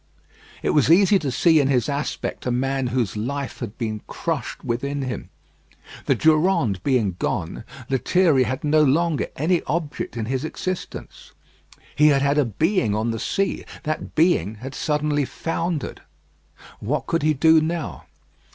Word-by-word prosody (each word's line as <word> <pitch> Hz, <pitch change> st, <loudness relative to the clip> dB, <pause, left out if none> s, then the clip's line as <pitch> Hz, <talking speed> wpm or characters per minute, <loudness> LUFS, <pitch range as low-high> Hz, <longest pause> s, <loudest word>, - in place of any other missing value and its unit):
It -, -, +2 dB
was 150 Hz, -2 st, +3 dB
easy 195 Hz, +3 st, +6 dB
to 145 Hz, -, -2 dB
see 160 Hz, +5 st, +4 dB
in 140 Hz, -, +2 dB
his 130 Hz, -4 st, +2 dB
aspect 145 Hz, -2 st, -3 dB
a -, -, +1 dB
man 135 Hz, +1 st, 0 dB
whose 120 Hz, -4 st, -1 dB
life 140 Hz, +6 st, -4 dB
had 115 Hz, -3 st, -6 dB
been 110 Hz, -3 st, -3 dB
crushed -, -, -4 dB
within 140 Hz, +4 st, -2 dB
him. 130 Hz, -2 st, -5 dB, 0.8 s
The -, -, +4 dB
Durande 155 Hz, -, +2 dB
being 110 Hz, -10 st, +1 dB
gone, 85 Hz, +5 st, -2 dB, 0.2 s
Lethierry 140 Hz, +3 st, +3 dB
had 130 Hz, +3 st, -3 dB
no 155 Hz, +1 st, +4 dB
longer 155 Hz, +2 st, +2 dB
any 170 Hz, +4 st, +1 dB
object 150 Hz, -6 st, -3 dB
in 110 Hz, -, -2 dB
his 130 Hz, +3 st, -2 dB
existence. 185 Hz, +3 st, -6 dB, 0.6 s
He 150 Hz, +1 st, +5 dB
had 140 Hz, -2 st, +4 dB
had 140 Hz, +1 st, +2 dB
a 145 Hz, -, +3 dB
being 120 Hz, -, +1 dB
on 110 Hz, +2 st, 0 dB
the 115 Hz, -, -4 dB
sea; 195 Hz, -, -1 dB, 0.2 s
that 155 Hz, -1 st, -4 dB
being 130 Hz, -, +2 dB
had 130 Hz, +5 st, -8 dB
suddenly 150 Hz, -1 st, 0 dB
foundered. 165 Hz, +3 st, -3 dB, 0.8 s
What 140 Hz, +8 st, -2 dB
could 165 Hz, -, 0 dB
he 155 Hz, 0 st, +2 dB
do 160 Hz, +3 st, +5 dB
now? 160 Hz, -1 st, -3 dB
140 Hz, 155 wpm, -23 LUFS, 125-160 Hz, 0.8 s, easy